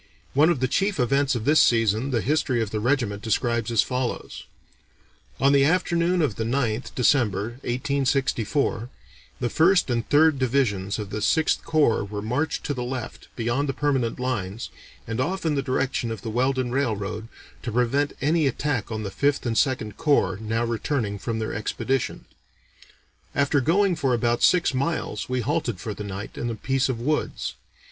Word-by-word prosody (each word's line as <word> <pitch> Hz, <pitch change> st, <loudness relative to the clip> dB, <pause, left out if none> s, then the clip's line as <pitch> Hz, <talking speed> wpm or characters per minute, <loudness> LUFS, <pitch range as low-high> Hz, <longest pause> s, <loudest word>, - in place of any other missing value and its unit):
One 150 Hz, +4 st, +5 dB
of 150 Hz, -7 st, 0 dB
the 130 Hz, -, +2 dB
chief 195 Hz, +6 st, 0 dB
events 135 Hz, +2 st, +2 dB
of 115 Hz, -, -3 dB
this 150 Hz, +2 st, +5 dB
season 115 Hz, +2 st, +3 dB
the 120 Hz, -4 st, 0 dB
history 145 Hz, -2 st, +1 dB
of 110 Hz, -3 st, -2 dB
the 110 Hz, -, -1 dB
regiment 115 Hz, -4 st, 0 dB
describes 115 Hz, 0 st, 0 dB
as 115 Hz, -4 st, +3 dB
follows: 125 Hz, -1 st, -4 dB, 0.9 s
"On 140 Hz, +1 st, +4 dB
the 140 Hz, -1 st, +5 dB
afternoon 170 Hz, +2 st, +2 dB
of 115 Hz, -9 st, -1 dB
the 115 Hz, -, -1 dB
9th 120 Hz, 0 st, -1 dB
(December, 120 Hz, -3 st, +1 dB
1864), 130 Hz, -2 st, 0 dB, 0.5 s
the 120 Hz, -, -1 dB
First 175 Hz, -3 st, +4 dB
and 115 Hz, -1 st, -1 dB
Third 155 Hz, -1 st, +4 dB
Divisions 115 Hz, -7 st, 0 dB
of 105 Hz, -2 st, -6 dB
the 110 Hz, -, -3 dB
Sixth 155 Hz, +9 st, +2 dB
Corps 150 Hz, -10 st, +2 dB
were 105 Hz, 0 st, -5 dB
marched 145 Hz, +8 st, -1 dB
to 145 Hz, -, -2 dB
the 125 Hz, -, -4 dB
left, 125 Hz, -1 st, -6 dB
beyond 120 Hz, +5 st, -1 dB
the 135 Hz, -, -2 dB
permanent 135 Hz, -6 st, 0 dB
lines, 115 Hz, -4 st, -3 dB, 0.3 s
and 115 Hz, +3 st, -2 dB
off 185 Hz, +6 st, -2 dB
in 160 Hz, -, +2 dB
the 140 Hz, -, +1 dB
direction 130 Hz, -2 st, -1 dB
of 110 Hz, -3 st, -6 dB
the 115 Hz, -, -4 dB
Weldon 130 Hz, +1 st, 0 dB
Railroad, 110 Hz, -5 st, -2 dB, 0.3 s
to 120 Hz, -, -4 dB
prevent 125 Hz, +5 st, +1 dB
any 155 Hz, +1 st, +2 dB
attack 135 Hz, -4 st, -2 dB
on 110 Hz, -1 st, -3 dB
the 100 Hz, -, -4 dB
Fifth 140 Hz, +6 st, 0 dB
and 115 Hz, -2 st, -1 dB
Second 110 Hz, -6 st, 0 dB
Corps, 140 Hz, -11 st, +2 dB
now 115 Hz, +2 st, -1 dB
returning 115 Hz, -3 st, -2 dB
from 115 Hz, +3 st, -3 dB
their 110 Hz, -1 st, -3 dB
expedition. 130 Hz, +4 st, -2 dB, 1.1 s
After 140 Hz, 0 st, +2 dB
going 185 Hz, +6 st, +3 dB
for 135 Hz, -5 st, +1 dB
about 120 Hz, 0 st, 0 dB
six 175 Hz, -5 st, +4 dB
miles 135 Hz, -6 st, -2 dB
we 130 Hz, -1 st, 0 dB
halted 125 Hz, -, -1 dB
for 110 Hz, -, -4 dB
the 105 Hz, -, -7 dB
night, 100 Hz, 0 st, -6 dB
in 120 Hz, -, -2 dB
a 115 Hz, -, -3 dB
piece 135 Hz, +5 st, 0 dB
of 125 Hz, -3 st, -2 dB
woods. 130 Hz, -, -1 dB
125 Hz, 175 wpm, -24 LUFS, 115-140 Hz, 1.1 s, One